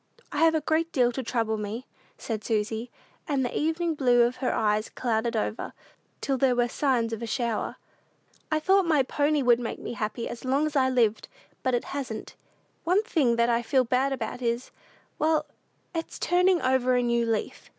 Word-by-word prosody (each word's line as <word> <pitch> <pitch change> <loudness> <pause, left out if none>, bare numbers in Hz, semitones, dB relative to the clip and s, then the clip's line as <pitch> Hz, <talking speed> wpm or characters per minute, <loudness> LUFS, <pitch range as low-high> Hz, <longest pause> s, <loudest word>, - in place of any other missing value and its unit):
"I - - -2
have 325 0 +5
a 315 - +1
great 320 +2 0
deal 245 -2 +3
to 265 - -3
trouble 225 -2 -1
me," 215 +4 -5 0.3
said 220 -2 -4
Susy, 220 +1 -1 0.4
and 275 -4 +1
the 245 - -4
"evening 325 +2 0
blue" 245 -5 +4
of 240 +1 0
her 255 -1 0
eyes 215 0 +1
clouded 235 -1 -1
over, 220 +1 -2 0.5
till 270 -2 -1
there 260 -2 +3
were 240 0 +2
signs 240 -3 0
of 225 - -4
a 230 - -4
shower. 235 -2 -2 0.8
"I 310 - +2
thought 380 +3 +3
my 300 -4 +4
pony 290 +2 +1
would 240 -1 +5
make 240 - -4
me - - -6
happy 225 +1 -3
as 235 - -7
long 270 +4 +1
as 305 -1 -3
I 260 -2 +3
lived; 230 -4 +1 0.3
but 255 -1 +1
it 240 - -1
hasn't. 255 -6 -6 0.5
One 370 +5 +2
thing 280 - +2
that 235 0 +2
I 235 0 +2
feel 255 +2 +2
bad 255 +3 +1
about 265 -1 -4
is 235 +1 -2 0.5
well, 310 -1 +2 0.5
it's 330 -1 -4
turning 360 0 +3
over 255 -1 +2
a 245 - +2
new 235 0 +2
leaf. 215 - -3
250 Hz, 190 wpm, -27 LUFS, 235-295 Hz, 0.8 s, have